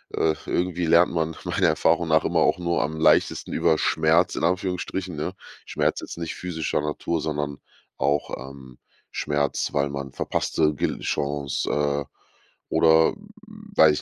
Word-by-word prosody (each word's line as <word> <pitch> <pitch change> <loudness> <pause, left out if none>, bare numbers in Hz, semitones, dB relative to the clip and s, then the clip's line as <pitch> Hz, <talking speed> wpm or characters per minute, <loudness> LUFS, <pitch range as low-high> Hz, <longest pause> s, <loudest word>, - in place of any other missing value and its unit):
äh, 80 -1 +2
irgendwie 90 -1 -1
lernt 85 +2 +5
man 80 -1 -1
meiner - - +1
Erfahrung 80 +2 +2
nach 80 0 +3
immer - - +1
auch - - +3
nur 85 -1 0
am 80 +2 -2
leichtesten - - +2
über 80 - +2
Schmerz 80 +3 +2
in - - -3
Anführungsstrichen, 90 0 -1
ne? 75 +5 -3 0.3
Schmerz - - 0
jetzt - - -8
nicht 85 -1 -4
physischer 80 -4 -2
Natur, 75 +2 -2
sondern 75 -2 -3 0.4
auch, 70 +2 0 0.2
ähm, 65 -2 -13 0.3
Schmerz, 75 -1 -1
weil 70 0 +1
man 70 -1 -5
verpasste 75 +3 0
Gel - - -2
Chance, 70 -1 -2
äh, 70 -1 0 0.6
oder 80 0 +4 0.6
weiß 80 -1 +7
80 Hz, 145 wpm, -24 LUFS, 75-85 Hz, 0.6 s, weiß